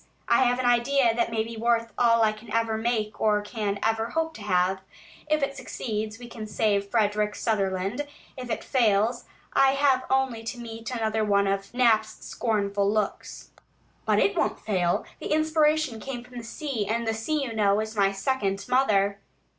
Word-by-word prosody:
I 235 +2 +4
have 245 0 +2
an 255 - -2
idea 245 0 +3
that 235 0 0
may 225 -1 0
be 230 +1 -8
worth 230 -1 +1
all 230 -1 +4
I 215 - +4
can 215 +1 -12
ever 225 0 +1
make 220 -2 -2
or 210 -1 +3
can 205 -2 -3
ever 225 +1 0
hope 325 +4 -1
to 220 - -11
have. 190 -1 +1 0.5
If 305 -1 +2
it 275 0 -1
succeeds, 220 -4 -4
we 245 0 -10 0.2
save 205 -2 0
Frederick 210 -2 +1
Sutherland; 200 +4 -1 0.3
if 250 -2 -7
it - - -2
fails, 235 0 +2 0.3
I 270 0 +5
have 275 -2 +2
only 265 -3 +1
to 225 +2 -5
meet 225 -1 -7
another 220 -3 -1
of 195 0 +1
Knapp's 220 -3 +2
scornful 200 -3 0
looks. 215 -1 -3 0.5
But - - +2
it 405 - +2
won't - - 0
fail; 180 -5 0
the - - -5
inspiration 310 -4 +2
came 245 0 -6
from 250 0 -10
the - - -8
sea, 230 -3 -4
and 230 +2 -1
the 225 - 0
sea, 280 +7 -1
you 240 -4 -4
know, 205 -2 +2
is 220 0 -4
my 195 -2 +3
second 195 -2 -1
mother!" 200 -6 +2
225 Hz, 180 wpm, -26 LUFS, 210-250 Hz, 0.5 s, I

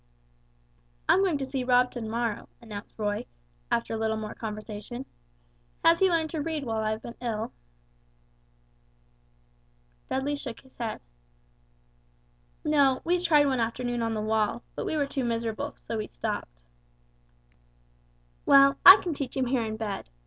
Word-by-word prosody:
"I'm 385 - +5
going 355 -6 +2
to 275 - -3
see 265 -1 -3
Rob 250 0 +4
to 245 - -6
morrow," 225 0 -2
announced 210 -3 -9
Roy, 205 -1 -2 0.4
after 115 - 0
a 220 - -2
little 220 0 0
more 215 -1 -5
conversation. 215 +3 -6 0.8
"Has 335 0 +6
he 385 -1 +5
learned 325 -2 +1
to 315 - -2
read 315 -1 -3
while 225 -3 -2
I 215 - 0
have 220 +1 -3
been 235 - -7
ill?" 225 -2 -3 2.6
Dudley 280 +2 -1
shook 260 -5 -7
his 265 -1 -21
head. 230 -2 -4 1.6
"No, 280 -4 +3
we 355 +2 +2
tried 300 -4 +5
one 265 -3 +1
afternoon 240 +1 -1
on 225 -1 -1
the 215 - -2
wall, 220 +2 0
but - - -3
we 315 - -1
were 290 - +2
too 275 -1 -3
miserable, 230 - -2
so - - -3
we - - -3
stopped." - - -4 1.9
"Well, 275 0 +6
I 390 - +12
can 345 - -2
teach 275 -3 -5
him 260 - +1
here 250 0 +1
in 220 -1 -3
bed. 210 - -4
240 Hz, 155 wpm, -28 LUFS, 220-280 Hz, 2.6 s, I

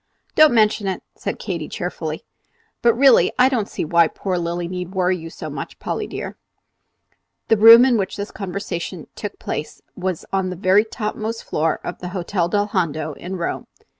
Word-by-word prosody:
"Don't 310 -1 +7
mention 215 -2 +3
it," 190 - -3
said - - -4
Katy, - - -4
cheerfully. - - -5 0.6
"But, 235 -1 +4
really, 270 +2 +5
I 255 +1 +6
don't 230 -6 -1
see - - -3
why 170 +1 +4
poor 190 +2 -3
Lilly 170 0 -2
need 180 +1 -6
worry 185 0 +2
you 165 -2 -8
so, - - -8 0.3
Polly - - -3
dear." - - -6 1.1
The 225 - +5
room 230 +3 +9
in 250 -3 +3
which 195 -2 -2
this 200 +1 -5
conversation 195 -3 -5
took - - -6
place - - -5 0.2
was 185 -3 -3
on 190 -1 +1
the 180 - -4
very 190 +4 +3
topmost 220 0 -4
floor 155 +1 0
of 175 - -6
the 180 - -6
Hotel 175 -1 -1
del 205 +2 +1
Hondo 160 -6 -1
in 180 +6 -7
Rome. 170 -2 -3
190 Hz, 175 wpm, -21 LUFS, 175-215 Hz, 1.1 s, room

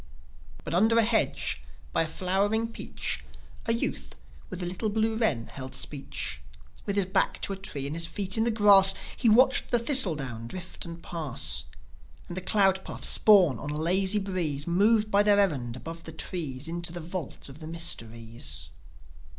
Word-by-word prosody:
But, - - -6
under 220 +6 +3
a 230 - +5
hedge, 220 0 +1 0.3
by - - +2
a 165 - 0
flowering 200 +7 0
peach, - - -4 0.4
A - - +2
youth 230 - -3 0.3
with 185 -1 -6
a - - -2
little 185 +5 -2
blue 220 +1 0
wren 155 - 0
held 130 -1 -8
speech. 135 - -4 0.5
With 200 - -1
his 200 -2 +2
back 190 +1 +1
to 200 - 0
a - - -4
tree 190 -8 -4
and 145 +3 -4
his 165 0 -2
feet 195 +1 0
in 220 - +2
the 235 - +2
grass, 200 -3 +6 0.2
He 235 - +2
watched 255 +5 +4
the 240 - +4
thistle 235 - +5
down 120 -5 -5
drift 185 +8 -8
and 170 0 -9
pass, 155 -7 0 0.6
And 175 - -7
the 185 - -3
cloud 190 -1 +3
puffs, - - 0
borne 180 - +5
on 145 - -6
a 150 - -3
lazy 185 +5 +2
breeze, 175 -8 -2
Move 210 +5 +2
by 200 - +4
on 205 - +4
their 205 -1 +5
errand, 135 -12 0
above 165 +7 -8
the 160 - -7
trees, 150 -5 -4
Into 170 0 -1
the 175 - -6
vault 170 -2 -6
of 140 +2 -12
the 155 - -9
mysteries. 115 - -3
180 Hz, 185 wpm, -27 LUFS, 150-205 Hz, 0.6 s, grass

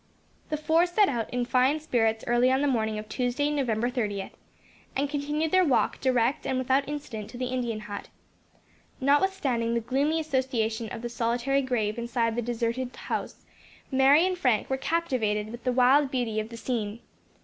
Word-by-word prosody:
The 305 - -1
four 325 +3 +3
set 395 +3 +3
out 235 -4 -2
in 245 0 -1
fine 260 +5 +2
spirits 225 -7 0
early 240 +2 +3
on 265 +1 +2
the 290 - +2
morning 220 -5 0
of 215 0 -6
Tuesday, 250 +5 -1
November 240 -6 0
30th, 210 -6 -3 0.6
and 280 +2 +1
continued 295 +2 -2
their 370 0 +5
walk 285 -7 +1
direct 255 +1 +1
and 260 - 0
without 265 +2 +1
incident 260 -8 -6
to 245 - -9
the 255 - -2
Indian 235 -4 -2
hut. 205 -2 -7 0.9
Notwithstanding 275 -5 +1
the - - +2
gloomy 275 +7 0
association 245 -7 -1
of 225 - -6
the 240 - -3
solitary 240 +4 0
grave 235 -4 -1
inside 235 -1 -1
the 240 - 0
deserted 240 +2 -2
house, - - -5 0.5
Mary 275 +5 +5
and 370 0 0
Frank 250 - +1
were - - +3
captivated 245 -9 -1
with 235 +1 -10
the 255 - +2
wild 260 +3 +4
beauty 240 -5 -1
of 215 +1 -4
the 230 - -9
scene. 230 -2 -3
250 Hz, 175 wpm, -27 LUFS, 230-280 Hz, 0.9 s, their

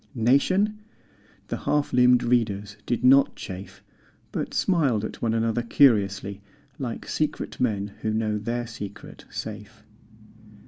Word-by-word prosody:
Nation? 185 - +2 0.7
The - - -2
half 150 -1 0
limbed 125 0 +5
readers 105 -4 0
did 120 - -1
not 135 +2 +5
chafe 95 +1 -9 0.5
But - - -3
smiled 140 - +1
at - - -8
one 115 -1 +1
another 115 +1 +1
curiously 100 -6 +2 0.4
Like 125 -4 -5
secret 155 -1 -2
men 105 -5 -1
who 110 - -1
know 110 -1 0
their 120 +3 -2
secret 105 -3 -9
safe. 105 0 -7
115 Hz, 125 wpm, -25 LUFS, 105-125 Hz, 0.7 s, limbed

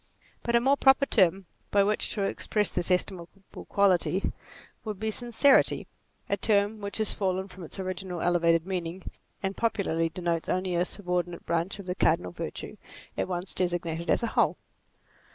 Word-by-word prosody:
But 235 - 0
a - - +6
more 270 +4 +3
proper 270 +1 +5
term 190 -5 +3 0.2
by 200 -1 +4
which 210 +1 0
to 205 - -1
express 210 +1 0
this 175 0 -1
estimable 180 -1 0 0.4
quality 195 -1 +2 0.5
would 215 -4 -5
be 220 0 -1
sincerity; 240 +4 +3 0.4
a 200 - 0
term 205 +1 +1
which 200 0 -4
has 220 -2 +2
fallen 190 -1 -1
from 185 -1 -11
its 165 - -8
original 185 -1 -4
elevated 170 -1 +2
meaning, 180 -1 -4 0.4
and 195 0 -1
popularly 175 -7 0
de 180 +2 -8
notes 170 -1 -1
only 185 0 0
a 175 +1 +2
subordinate 180 -3 -2
branch 170 +4 -1
of 200 - -9
the 180 - -2
cardinal 90 - +1
virtue - - -6 0.4
it - - -1
once 180 +1 -4
designated 170 -2 -2
as - - +2
a - - +1
whole. - - +2
185 Hz, 170 wpm, -28 LUFS, 175-205 Hz, 0.5 s, a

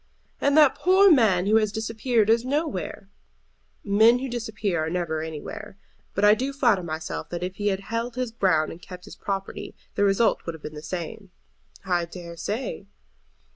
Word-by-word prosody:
"And 280 +2 +2
that 300 -4 +7
poor 380 +2 +5
man 210 - +4
who 215 +2 +4
has 215 -2 +1
disappeared 225 +1 0
is 225 +1 +3
nowhere." 265 - -3 0.8
"Men 220 +4 +5
who 265 +2 -4
disappear 215 -8 -2
never 170 -2 -2
are - - -3
anywhere. 190 +6 -7 0.4
But 200 - +3
I 210 - +8
do 260 +5 -1
flatter 240 -9 +3
myself 160 -2 -5
that 175 0 -4
if 185 +1 -4
he 205 - -1
had 195 -1 0
held 230 +3 -3
his 255 -2 -2
ground 185 -8 +1
and 165 - -11
kept 180 0 -10
his - - -11
property 195 -1 -5 0.2
the - - +1
result 200 +3 +2
would 165 - -3
have 160 - -15
been 150 - -6
the 150 - -8
same." 180 +5 -6 0.6
"I 175 -2 +1
dare 170 0 -9
say." 205 +4 -4
205 Hz, 180 wpm, -25 LUFS, 175-230 Hz, 0.8 s, I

